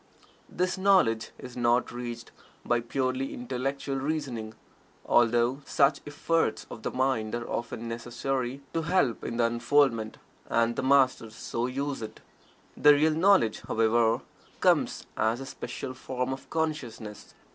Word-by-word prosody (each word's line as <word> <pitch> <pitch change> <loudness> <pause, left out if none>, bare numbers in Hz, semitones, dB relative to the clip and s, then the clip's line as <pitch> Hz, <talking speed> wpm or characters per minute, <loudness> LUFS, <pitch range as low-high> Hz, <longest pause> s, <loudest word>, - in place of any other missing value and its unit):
This 180 +1 -1
knowledge 180 - +3
is 125 -1 -10
not 120 0 +2
reached 120 -1 -6 0.3
by 120 - +2
purely 130 +2 -2
intellectual 135 +3 -3
reasoning, 135 -7 -3 0.5
although 120 +3 +3
such 140 0 +2
efforts 160 +3 0
of 115 - -8
the - - -2
mind 125 -4 0
are 120 0 -4
often 115 0 -4
necessary 120 +3 -3
to 165 - 0
help 160 -8 +1
in 115 - -4
the 120 - +3
unfoldment, 120 -1 +2 0.3
and 115 0 +2
the - - -1
Masters 130 -4 +3
so 115 +1 -3
use 140 +1 -3
it. 110 - -7 0.6
The 150 0 +7
real 155 +2 +3
knowledge, 165 - +3
however, 115 +1 +2 0.4
comes - - +2
as 110 +2 +1
a 135 - -6
special 130 0 -6
form 130 0 -3
of 135 - -10
consciousness. 125 -10 -4
125 Hz, 135 wpm, -28 LUFS, 115-140 Hz, 0.6 s, The